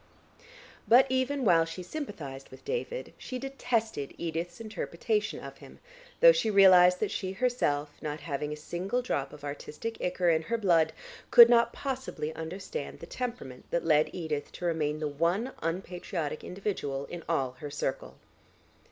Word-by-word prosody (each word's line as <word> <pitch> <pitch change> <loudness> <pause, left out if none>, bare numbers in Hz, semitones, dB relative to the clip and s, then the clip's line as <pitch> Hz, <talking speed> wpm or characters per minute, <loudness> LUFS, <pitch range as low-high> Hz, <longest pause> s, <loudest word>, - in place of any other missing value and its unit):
But 250 +3 +7
even 260 +1 0
while 165 -4 +6
she 165 +3 -6
sympathised 165 - -7
with 130 - -14
David, - - -4
she 255 - -5
detested 230 - -2
Edith's 170 +1 -4
interpretation 230 - -2
of - - -10
him, - - -13 0.4
though - - +10
she 230 - +1
realised 180 -3 +7
that 215 - 0
she 190 -1 -3
herself, 190 - 0
not 150 -1 -4
having 150 -1 -3
a - - -3
single 185 +10 -3
drop 140 - -2
of 150 -1 -13
artistic 150 +10 -6
ichor 180 -1 +2
in 160 -1 +2
her 230 +9 -1
blood, 170 -7 +3 0.4
could 235 -1 +10
not 235 -1 +5
possibly 260 - -4
understand 180 - -6
the - - -8
temperament 235 - -6
that 170 - -1
led 155 -2 +4
Edith 155 -5 -4
to 180 - -6
remain 155 -3 0
the 155 0 -2
one 170 - 0
unpatriotic 170 -2 -3
individual 180 -8 -3
in 175 - -7
all 135 -6 +1
her 145 - -6
circle. 140 -2 -3
175 Hz, 155 wpm, -29 LUFS, 150-230 Hz, 0.4 s, though